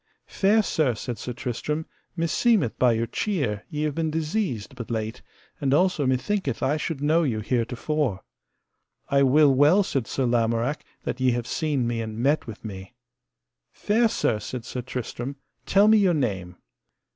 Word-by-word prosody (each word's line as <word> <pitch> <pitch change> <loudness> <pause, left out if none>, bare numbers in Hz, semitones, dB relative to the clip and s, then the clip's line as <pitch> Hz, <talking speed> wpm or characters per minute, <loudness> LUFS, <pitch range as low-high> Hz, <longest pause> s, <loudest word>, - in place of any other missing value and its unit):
Fair 210 +3 +2
sir, 145 - +1
said 120 +2 -5
Sir 125 - -5
Tristram, 130 +6 -3 0.3
meseemeth 170 - +2
by 125 -2 +5
your 115 +1 0
cheer 130 - -2
ye 150 0 -3
have 150 -1 0
been 160 +1 -1
diseased 155 - -2
but 120 -2 -7
late, 110 -1 -3 0.4
and 140 -1 +2
also 180 -4 +2
methinketh 135 - -1
I 135 +3 +2
should 155 -2 -3
know 160 +3 +3
you 125 -9 0
heretofore. 125 0 -1 0.9
I 140 0 +3
will 140 +1 +5
well, 150 +9 +5
said 135 - -2
Sir 135 - -1
Lamorak, 120 +3 0 0.2
that 130 - -4
ye 130 -1 +3
have 120 -1 -2
seen 145 -2 -1
me 115 -1 -1
and 110 -1 -5
met 140 +5 +1
with 115 0 -9
me. 95 +2 -8 0.8
Fair 225 +2 +2
sir, 115 - 0
said 115 +2 -6
Sir 125 - -4
Tristram, 125 +2 -5 0.3
tell 200 +2 +5
me 220 0 +6
your 185 -4 +3
name. 95 - -2
135 Hz, 165 wpm, -25 LUFS, 115-155 Hz, 0.9 s, me